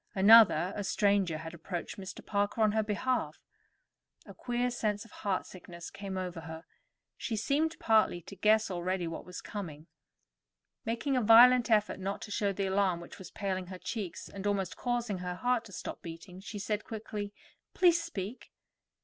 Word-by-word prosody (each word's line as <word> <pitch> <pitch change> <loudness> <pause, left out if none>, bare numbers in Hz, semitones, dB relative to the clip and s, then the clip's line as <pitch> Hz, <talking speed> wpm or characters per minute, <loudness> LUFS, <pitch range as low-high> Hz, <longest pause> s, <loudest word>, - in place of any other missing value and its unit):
Another, 195 -3 +7
a 205 - -3
stranger 200 -4 +2
had 165 +1 -7
approached 170 +1 -5
Mr. 190 -1 -8
Parker 205 +2 0
on 215 - +4
her 220 +1 +2
behalf. 215 -5 -1 0.9
A - - -11
queer 245 0 -1
sense 210 -3 -1
of 225 - -17
heartsickness 180 -3 -5
came 195 -1 -6
over 180 -2 -4
her; 160 0 -8 0.5
she 230 - -3
seemed 295 +9 0
partly 220 -5 +3
to 200 - -10
guess 215 +2 +3
already 180 0 -1
what 165 - -6
was 180 0 -8
coming. 160 -7 -7 1.0
Making 235 +5 -1
a - - +2
violent 240 +2 +7
effort 210 -3 +2
not 195 +1 -3
to 210 - -8
show 200 0 +1
the 195 0 -2
alarm 190 -2 +1
which 170 - -11
was 185 - -9
paling 190 -2 -3
her 185 0 -7
cheeks, 195 0 -5
and 200 0 -5
almost 195 -3 -1
causing 240 -5 -2
her 180 0 -4
heart 245 +3 0
to 200 - -12
stop - - -6
beating, 170 +2 -9
she 205 +2 -7
said 210 +1 -2
quickly: 210 -2 -5 0.4
"Please 345 -2 +5
speak." 230 - -6
200 Hz, 170 wpm, -31 LUFS, 185-225 Hz, 1.0 s, Another